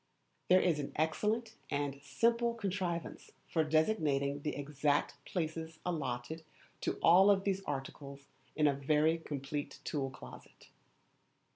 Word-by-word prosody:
There 185 0 +7
is 165 -4 +2
an 140 - -4
excellent 215 +9 0 0.2
and 140 -1 -2
simple 235 +8 +1
contrivance 185 -6 -3
for 160 - +1
designating 150 -4 +1
the 150 - -2
exact 145 0 0
places 160 -1 -3
allotted 155 -2 -3 0.4
to - - -2
all 190 +4 +7
these 195 0 -1
articles 140 0 -6 0.3
in 150 - +3
a 145 - +5
very 150 +4 +2
complete 145 -1 -4
tool 135 -3 -2
closet. 60 - -13
155 Hz, 120 wpm, -34 LUFS, 140-180 Hz, 0.4 s, There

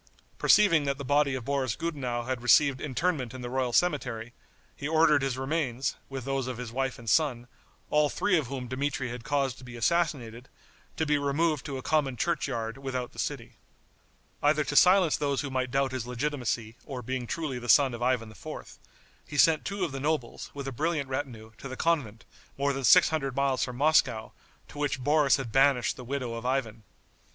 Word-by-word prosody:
Perceiving 170 -8 +5
that 140 -1 -1
the 140 - -6
body 145 0 +2
of 125 -3 -5
Boris 135 -4 -1
Gudenow 130 -8 -3
had 130 0 -3
received 130 +2 +4
interment 140 -3 -1
in 130 - -7
the 120 - -5
royal 130 -1 0
cemetery, 125 -7 0 0.4
he 140 - -5
ordered 155 -2 +4
his 135 -2 -1
remains, 135 -2 -1
with 135 -3 -6
those 135 -2 -1
of 130 -2 -4
his 125 -2 -6
wife 135 +1 -2
and 120 - -13
son, 125 -3 +1 0.4
all 150 -1 +3
three 205 +4 +1
of 155 -7 0
whom 130 -1 -5
Dmitri 130 0 -2
had 120 -1 -7
caused 140 -2 -1
to - - -13
be 125 -1 -10
assassinated, 130 -4 -1 0.5
to 160 - 0
be 150 -1 +2
removed 145 +1 0
to 140 -2 -4
a 130 - -7
common 140 -5 +1
churchyard 115 -7 -2
without 130 -2 -4
the - - -12
city. - - -4 0.8
Either 150 +1 +3
to 145 - -4
silence 180 -1 +6
those 140 -2 0
who 140 -2 -5
might 130 -1 -1
doubt 135 +1 0
his 125 -3 -4
legitimacy 125 -3 -3
or 130 -5 -7
being 130 +1 -3
truly 150 -5 -3
the 120 0 -8
son 135 -1 +6
of 120 - -7
Ivan 120 -3 0
IV., 110 - -9 0.5
he 150 - -6
sent 160 +1 +4
two 200 -1 -2
of 160 - -5
the 135 - -5
nobles, 145 -3 -2
with 140 -1 -5
a - - -3
brilliant 150 +1 -1
retinue, 125 -5 -5
to - - -7
the 130 -1 -7
convent, 135 -10 -1 0.3
more 140 0 +1
than 135 0 -4
six 180 +6 +7
hundred 135 -5 -2
miles 140 -1 +1
from 125 - -4
Moscow, 130 -5 +2 0.4
to 145 - -10
which 140 -3 -1
Boris 145 0 +4
had 130 -5 -5
banished 135 0 +3
the 125 - -9
widow 125 -2 -3
of 115 0 -6
Ivan. 120 -4 -2
135 Hz, 200 wpm, -28 LUFS, 125-150 Hz, 0.8 s, six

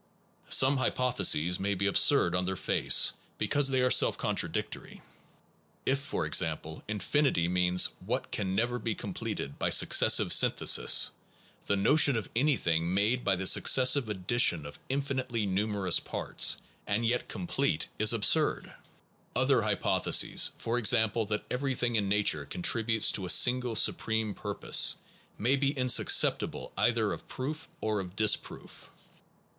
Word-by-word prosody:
Some 135 +1 +4
hypotheses 120 -10 0
may 100 +1 -2
be 95 +2 -3
absurd 100 -1 +3
on 90 0 -1
their 95 +1 -4
face, - - +2 0.2
because 145 -1 +1
they 130 -1 0
are 125 0 +1
self - - +3
contradictory. - - -4 0.8
If, 135 +1 0
for 140 +1 -4
example, 80 -2 -2
infinity 110 - -1
means 90 0 +1
what - - -5
can 95 -2 -4
never 120 +3 -2
be 110 -1 -4
completed 70 - -7
by - - -1
successive - - +4
syntheses, - - +3 0.6
the 100 - 0
notion 140 +5 +3
of 110 - -6
anything 85 - -1
made 110 +6 0
by 95 - 0
the 95 +1 -6
successive 130 +4 +4
addition 95 -5 0
of 70 - -11
infinitely 130 -5 -3
numerous 100 -1 0
parts, - - -1 0.3
and 105 +3 -2
yet 120 +2 -2
completed, 140 - -2
is 110 0 +4
absurd. 115 -3 +1 0.6
Other - - +1
hypotheses, - - +1
for 115 +2 -3
example 110 -2 +1
that 105 0 -4
everything 125 -2 -2
in 100 -3 -1
nature 100 -8 0
contributes 110 +6 +1
to 95 -2 -4
a - - -9
single 125 +1 +3
supreme 110 -1 0
purpose, 100 0 +1 0.4
may 125 +6 0
be 140 0 -1
insuscep 125 -1 +3
tible - - -7
either - - 0
of - - -11
proof 150 +5 -7
or 110 -1 -2
of 90 -1 -9
disproof. 110 +1 -2
110 Hz, 140 wpm, -28 LUFS, 95-125 Hz, 0.8 s, Some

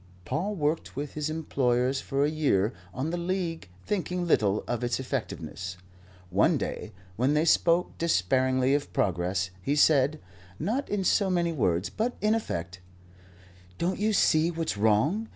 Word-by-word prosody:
Paul 200 - -2
worked 155 -1 -1
with 145 +1 -4
his 150 0 -2
employers 130 -4 0
for 140 +1 0
a - - +1
year 120 -9 +1 0.2
on 135 - -3
the 175 - -2
League 170 - -3 0.2
thinking 180 -2 -2
little 105 - +2
of 120 0 -2
its 120 +1 0
effectiveness. 95 - -5 0.5
One 95 +3 +3
day, - - -4 0.3
when 130 +6 +2
they 155 +2 +2
spoke 170 +1 +3
despairingly 130 - +2
of 145 0 -1
progress, 90 +1 0
he 140 +10 0
said, 150 0 +4 0.4
not 225 - -2
in 205 -2 -1
so 195 +2 +2
many 175 -2 +1
words, 95 - 0
but 235 +3 -2
in 215 +1 +2
effect: 95 - -3 1.0
"Don't 180 +3 -1
you 215 +1 +2
see 160 -5 +3
what's 165 -6 -2
wrong? 110 - +2
145 Hz, 150 wpm, -28 LUFS, 115-170 Hz, 1.0 s, said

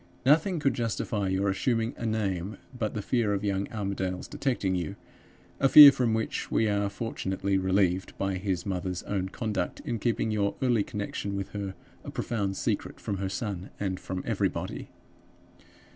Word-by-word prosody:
Nothing 160 +6 +4
could 140 -4 +2
justify 110 -3 -1
your 95 +1 +1
assuming 115 +4 0
a 115 - -4
name 100 -3 -2 0.2
but 110 -3 -2
the 105 - -3
fear 110 -4 +1
of 100 - -3
young 100 -1 -1
Armadale's 95 -4 -3
detecting 120 -9 -1
you 90 -4 -2 0.6
a 135 - +4
fear 145 0 +12
from 120 -4 +1
which 110 -1 -2
we 110 - +2
are 100 -1 +1
fortunately 100 -3 -2
relieved 95 -1 +1
by 95 -1 -1
his 95 -2 -2
mother's 90 -2 -3
own 95 -2 -2
conduct 105 -4 -3
in 120 -2 -3
keeping 115 -1 0
your 100 -2 0
early 120 -4 +3
connection 100 -1 -4
with 95 -1 -3
her 100 -2 -5 0.3
a - - -7
profound 100 -5 -2
secret - - -2
from 100 - -3
her 95 0 -2
son 100 -2 -4
and 95 -2 -2
from 95 0 -5
everybody. - - -2
100 Hz, 165 wpm, -28 LUFS, 95-115 Hz, 0.6 s, fear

